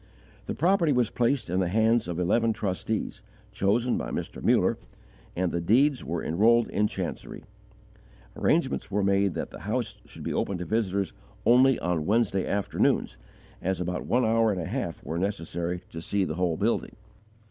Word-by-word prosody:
The - - -3
property 170 -1 +3
was 125 -4 +2
placed 125 +2 +1
in 90 +2 0
the 90 - +1
hands 110 +3 +2
of 85 0 -3
eleven 110 +6 +2
trustees, 105 +2 -3 0.3
chosen 105 +5 +1
by - - -4
Mr. - - -5
Muller, - - +2 0.6
and 90 -1 0
the 85 - -1
deeds 130 - +3
were 85 0 -3
enrolled 115 +7 +3
in 105 +1 +2
chancery. 95 -4 -6 0.9
Arrangements 70 +3 +1
were 100 +1 0
made 100 -1 +2
that - - -4
the - - -9
house - - -3
should - - -11
be - - -2
open 100 - -1
to 90 - -5
visitors 100 -3 -1 0.3
only 130 +2 +5
on 85 -3 -1
Wednesday 100 -3 +1
afternoons, 100 0 0 0.4
as 95 0 -1
about 90 0 -3
one 125 0 +2
hour 115 0 +3
and 95 - -2
a 85 - -3
half - - -4
were 80 +3 -3
necessary 90 -2 -3
to 80 - -6
see 100 +3 0
the 75 - -3
whole 85 -1 0
building. 110 +4 -1
100 Hz, 170 wpm, -27 LUFS, 90-115 Hz, 0.9 s, only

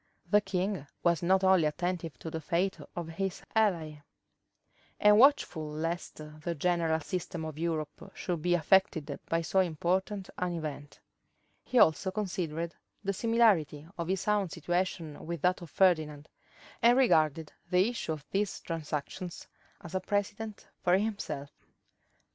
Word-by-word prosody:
The 210 0 +6
king 190 -5 -2 0.2
was 170 -2 +3
not 190 +2 +3
only 190 -4 +5
attentive 170 +1 -2
to 160 - -7
the 160 - -4
fate 180 +5 0 0.2
of 170 -2 -4
his 185 +3 -3
ally, 165 -9 +1 1.0
and 210 0 +6
watchful 230 - +4
lest 165 +3 -3 0.3
the 170 +1 -2
general 165 0 +1
system 170 0 -4
of 155 -1 -6
Europe 160 -3 -3
should 175 -3 -3
be 175 +2 +3
affected 160 -4 +2
by 165 0 +1
so 190 +4 +1
important 185 +3 0
an 180 -1 -1
event; 145 -3 -6 0.6
he 255 - -1
also 190 -2 +5
considered 170 -5 -3 0.3
the 195 0 0
similarity 200 -10 +2
of 170 -2 -4
his 190 +2 -1
own 205 -3 +2
situation 170 -2 -2
with 170 -2 -5
that 180 +1 +2
of 170 - -9
Ferdinand, 155 -4 +2 0.5
and 240 +2 +6
regarded 160 - +3 0.2
the 180 +2 +4
issue 235 -8 -3
of 150 -2 -8
these 200 0 -1
transactions 165 +2 -5 0.4
as 175 - -10
a 185 - +1
precedent 205 +2 -3
for 180 +1 +4
himself. 195 -9 -3
175 Hz, 140 wpm, -30 LUFS, 160-190 Hz, 1.0 s, The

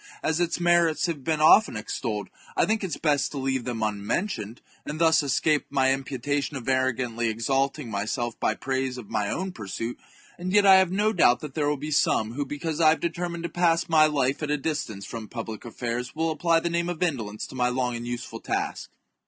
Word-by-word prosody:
As 160 +1 +1
its 175 -1 0
merits 170 -2 +3
have 160 -6 -3
been 155 +2 0
often 155 - +6
extolled, 105 -2 -4 0.3
I - - +4
think 220 -1 0
it 180 -6 -3
best 145 -3 +2
to - - -5
leave 130 -2 -1
them 120 -3 -3
unmentioned, 110 - -2 0.2
and 150 - -5
thus 160 -2 +5
escape 145 +2 +1
any 135 0 +3
imputa 140 +2 -2
tion 140 0 -4
of 125 - -9
arrogantly 130 -3 0
exalting 135 +3 -1
myself 110 +4 -2
by 110 - +1
praise 130 0 -2
of 115 -5 -10
my 105 -2 0
own 190 +2 -2
pursuit. 115 - -5 0.4
And 180 +1 -3
yet 205 -1 +5
I 190 -1 +9
have 190 -2 +3
no 210 +3 +1
doubt 120 - +4
that 150 -3 -7
there 145 -1 0
will 150 - 0
be 150 +3 -5
some 115 -6 +2
w^ho, 140 +2 -3
because 155 +3 -3
I 155 - +7
have 160 - +2
determined 170 0 -3
to 170 - -2
pass 170 -1 +2
my 155 -2 +6
life 140 -1 0
at 150 - -2
a 150 - +1
distance 135 -10 -3
from 115 +1 -7
public 110 -2 -7
affairs, 120 +2 -4
will 160 +1 0
apply 165 +1 +2
the 170 - -2
name 170 +1 0
of 175 0 -2
indolence 110 -11 -2
to - - -11
my 125 -1 +2
long 125 -1 -1
and 120 0 -5
useful 120 0 -5
task.. - - -3
140 Hz, 215 wpm, -26 LUFS, 120-165 Hz, 0.4 s, I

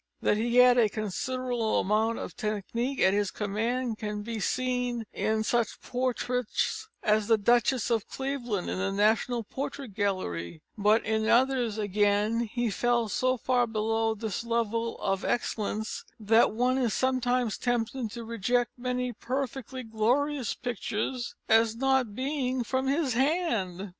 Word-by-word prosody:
That 210 - +3
he 235 +2 0
had 250 0 +7
a 220 -3 +4
considerable 230 +3 -1
amount 220 +3 +1
of - - -6
technique 230 +5 -2
at 190 - +5
his 205 -1 +1
command 225 +3 -2
can 210 -1 -4
be 225 0 -4
seen 245 +1 -1
in 220 0 0
such 235 0 0
portraits 250 - -2
as 210 0 +2
the 225 - +5
"Duchess 240 +2 +2
of 225 -3 +1
Cleveland" 250 -8 -3
in - - -2
the 195 +1 0
National 220 +4 +2
Portrait 270 0 -6
Gallery, 160 - -2
but 210 +2 +3
in 220 0 0
others 245 -3 +3
again 205 +2 +1
he 240 -2 0
fell 240 +1 +1
so 255 +4 +1
far 245 0 +1
below 225 0 0
this 220 0 -4
level 230 0 -1
of 195 0 -1
excellence, 220 -2 -2 0.2
that 225 +2 +4
one 250 +4 +1
is 240 -4 +1
sometimes 250 -3 +1
tempted 240 0 -1
to 235 +2 -7
reject 235 +2 0
many 250 0 -2
perfectly 260 +1 -4
glorious 245 +4 0
pictures 240 +1 -3
as 225 0 +4
not 265 -3 +1
being 260 -1 -1
from 260 +2 -1
his 280 -2 +1
hand. 230 - 0
235 Hz, 145 wpm, -28 LUFS, 215-250 Hz, 0.2 s, had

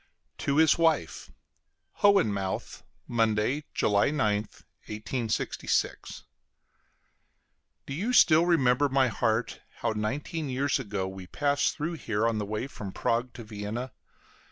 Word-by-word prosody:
TO 140 +1 0
HIS 160 +1 +5
WIFE 165 -1 +1 0.7
HOHENMAUTH, 105 - +1 0.3
Monday, 115 +5 +1
July 100 +3 +2
9th, 105 -7 -1 0.3
1866. 110 +1 -2 1.6
Do 135 - -6
you 200 - -1
still 165 -8 +6
remember, 140 -4 +3
my 135 -1 +3
heart, 115 +1 -1 0.2
how - - +1
nineteen 140 +8 -3
years 135 +2 0
ago 100 -6 -3
we 95 -1 -8
passed 145 +4 0
through 160 +3 -3
here 115 -8 -1
on 115 -2 0
the 105 - -2
way 105 +4 -3
from 105 -8 -7
Prague 120 +5 -1
to 120 - -9
Vienna? 110 +4 -5
120 Hz, 120 wpm, -28 LUFS, 105-145 Hz, 1.6 s, still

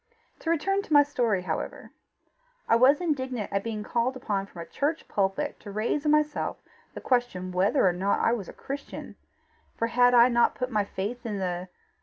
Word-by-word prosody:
To 325 - -4
return 390 +5 +1
to 325 - -5
my 290 0 +8
story, 235 -9 0
however: - - -4 0.8
I - - +5
was 260 +6 +5
indignant 260 - -2
at 200 0 0
being 220 -2 -4
called 240 +4 0
upon 200 -6 -2
from 170 -4 -8
a - - -12
church 300 - -2
pulpit 200 +9 -1
to 205 - -10
raise 225 +8 -1
in 300 - +4
myself 300 0 +1 0.4
the - - -6
question 240 -8 0
whether 190 +6 +3
or 180 - +3
not 190 +3 0
I - - +3
was 205 -7 -4
a - - -9
Christian; 280 +1 -7 0.6
for 230 - 0
had 245 +1 +4
I 240 0 +8
not 235 -1 +3
put 255 +1 -3
my 210 -3 +1
faith 210 +5 -5
in 215 -3 -3
the 180 -1 -3
235 Hz, 195 wpm, -27 LUFS, 200-275 Hz, 0.8 s, my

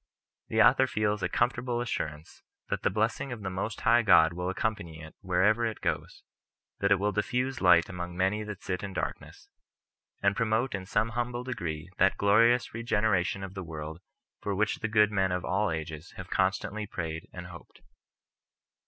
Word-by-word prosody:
The 110 0 +4
author 130 +5 +5
feels 105 -3 0
a 90 - 0
comfortable 120 +2 0
assurance 80 -10 -4 0.3
that - - -1
the - - +2
blessing 110 +6 -1
of 115 -4 -6
the 95 - -3
Most 95 +4 -4
High 120 +1 +5
God 80 -6 +6
will 90 +1 -3
accompany 100 -5 -3
it 80 0 -10
wherever 100 +5 +2
it 110 -3 -2
goes, - - -3 0.6
that 100 - +2
it 100 - +6
will 105 +2 0
diffuse 125 +6 -1
light 90 -2 +6
among 90 -1 -6
many 95 +3 +1
that 105 -3 -8
sit 90 -1 -3
in 100 -1 -6
darkness, - - -5 0.7
and 100 0 +2
promote 115 +4 +1
in 95 -2 -5
some 110 +2 +1
humble 120 +1 -3
degree 85 -11 -4
that 95 +1 +4
glorious 115 +5 +4
regeneration 105 -5 0
of 95 -1 -7
the 95 -2 -5
world 80 -1 -7 0.4
for 100 -1 -2
which 110 +2 +1
the 110 - -1
good 105 -1 +4
men 95 -2 +1
of 90 0 -2
all 100 +4 +1
ages 80 +1 -5
have 95 0 -9
constantly 100 +2 0
prayed 80 -3 -5
and 90 0 -8
hoped. 85 -1 -13
100 Hz, 180 wpm, -29 LUFS, 90-110 Hz, 0.7 s, God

